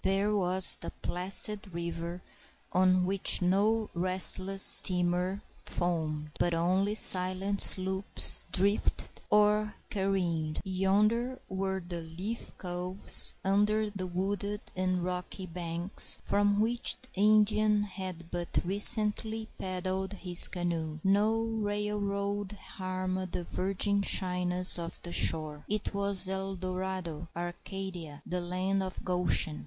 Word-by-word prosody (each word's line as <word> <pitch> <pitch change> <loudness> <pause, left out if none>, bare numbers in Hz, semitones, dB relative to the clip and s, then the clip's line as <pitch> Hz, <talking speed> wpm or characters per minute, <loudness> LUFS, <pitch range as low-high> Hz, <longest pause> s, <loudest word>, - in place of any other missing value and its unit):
There 200 +2 0
was 185 -1 +7
the - - -5
placid 195 +1 -2
river, 170 +1 -6 0.5
on 185 0 +2
which 195 +1 +2
no 205 +5 0
restless 185 +2 +1
steamer 180 +2 +4 0.2
foamed, 155 -4 -4
but 175 -1 0
only 185 +5 -1
silent 190 0 +2
sloops 190 +1 +3
drifted 200 +2 -1
or 210 0 +1 0.2
careened. 175 -6 -2
Yonder 210 +6 0
were 190 0 -3
the 175 -1 -6
leafy 180 +8 -7
coves 180 +1 +4
under 210 +2 0
the 190 -2 -6
wooded 200 +3 -4
and 185 -1 -2
rocky 180 +1 -5
banks, 170 +1 +1
from 205 0 0
which 235 +2 0
the 255 - -13
Indian 210 0 +3
had 185 -4 -8
but 175 -1 -5
recently 215 +3 +5
paddled 185 +1 -4
his 180 -3 +5
canoe. 165 -3 -4
No 210 +4 +1
railroad 205 -2 -3
harmed 185 -2 -6
the 175 - -3
virgin 195 +3 -2
shyness 180 -2 +2
of 170 0 -7
the 175 - -5
shore. 155 -2 0
It 210 0 -3
was 200 -1 +1
El 190 0 -3
Dorado, 185 -3 -6
Arcadia, 175 -2 -8
the 180 0 -4
land 185 +2 -2
of 185 -1 -7
Goshen. 180 - -1
190 Hz, 115 wpm, -28 LUFS, 180-205 Hz, 0.5 s, was